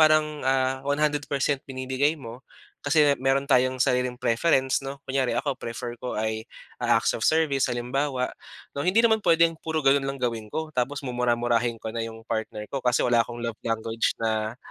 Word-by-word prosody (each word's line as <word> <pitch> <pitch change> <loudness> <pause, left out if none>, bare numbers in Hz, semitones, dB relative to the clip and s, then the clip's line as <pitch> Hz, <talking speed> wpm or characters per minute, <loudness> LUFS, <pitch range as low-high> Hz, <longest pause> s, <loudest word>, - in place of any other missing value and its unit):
parang 155 0 +5 0.6
100% 145 -1 0
binibigay 130 +3 0
mo, 120 -4 -9 0.4
kasi 145 0 +4
meron 135 +1 +2
tayong 130 -2 +3
sariling 125 0 +1
preference 130 +3 +2
'no. 135 0 -8
Kunyari 130 -3 0
ako 140 +3 0
prefer 120 0 -5
ko 125 - -4
ay 110 +1 -2 0.3
acts - - +2
of - - -5
service 155 -4 +2
halimbawa, 125 +2 -1 0.4
no. 140 - -4
Hindi 185 +9 +3
naman 220 -1 +4
puwedeng 170 -3 +4
puro 160 -2 -2
ganun 135 0 +4
lang 135 - -3
gawin 115 -3 -2
ko 155 +7 -4
tapos 135 +2 -2
mumura-murahin 120 -1 +1
ko 110 0 -6
na 115 - -3
yung 115 0 -6
partner 110 -2 -3
ko 135 - -1
kasi 125 -1 +2
wala 120 -1 +4
akong 120 +1 -3
love 115 -2 -4
language 115 0 -1
na 110 0 -1
130 Hz, 165 wpm, -26 LUFS, 115-145 Hz, 0.6 s, parang